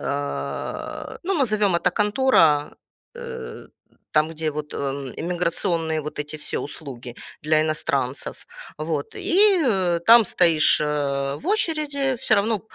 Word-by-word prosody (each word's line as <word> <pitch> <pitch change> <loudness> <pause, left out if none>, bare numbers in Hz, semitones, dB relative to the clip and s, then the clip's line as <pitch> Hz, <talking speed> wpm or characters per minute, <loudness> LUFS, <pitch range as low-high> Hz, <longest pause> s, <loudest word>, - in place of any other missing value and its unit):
э, 140 0 -4
ну, 390 +1 0
назовем 215 - +2
это - - +1
контора, 205 - +3 0.4
э, 475 -1 -8 0.5
там, 155 +1 +2
где 160 -1 -3
вот, 150 0 -6
э, 135 -2 -4
иммиграционные 170 -2 -1
вот 150 0 -7
эти 150 +1 -4
все 150 - -3
услуги 125 -5 -7 0.3
для 155 0 +3
иностранцев. 140 -4 -2 0.3
Вот. 155 -2 -3
И 395 0 +3 0.5
там 230 -1 +8
стоишь, 165 -5 +4
э, 140 -2 -1
в 310 - -11
очереди. 300 -9 0
Всё - - +2
равно, 210 +1 +1
160 Hz, 120 wpm, -23 LUFS, 145-240 Hz, 0.5 s, там